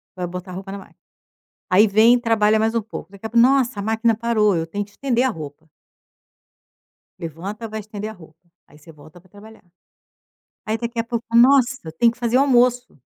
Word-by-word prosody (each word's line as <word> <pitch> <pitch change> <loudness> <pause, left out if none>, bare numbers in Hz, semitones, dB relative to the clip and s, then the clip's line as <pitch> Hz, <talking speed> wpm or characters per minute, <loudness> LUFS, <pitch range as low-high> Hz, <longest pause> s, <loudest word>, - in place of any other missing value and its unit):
vai 180 -1 -4
botar 180 +1 -8
a - - -8
roupa 195 +1 -8
na 200 - -6
máquina. - - -17 0.7
Aí 195 +4 +5
vem 220 +4 +5
e - - 0
trabalha 220 -2 +2
mais 220 +1 0
um 230 - +1
pouco, 205 -4 -10
daqui 200 +2 -13
a - - -3
pouco: 235 +1 +4
"Nossa, 260 -5 +1
a - - -3
máquina 225 +1 +1
parou, 215 -3 +1
eu 165 -1 -2
tenho 205 +5 -4
que 205 - -23
estender 245 +2 -1
a - - +2
roupa". 155 - -9 1.5
Levanta, 185 +8 -7
vai 220 0 -6
estender 210 0 -7
a - - -9
roupa. 160 -5 -18 0.3
Aí 150 - -19
você 155 +2 -16
volta 155 +3 -17
pra 185 +2 -25
trabalhar. 215 +2 -16 1.0
Aí 220 +1 -1
daqui 235 0 -5
a - - -3
pouco: 235 0 -4
"Nossa, 260 +1 +5
eu 160 - -8
tenho 230 +8 +2
que 235 - -22
fazer 240 0 0
o - - +5
almoço". 250 -2 +2
220 Hz, 215 wpm, -21 LUFS, 185-235 Hz, 1.5 s, Aí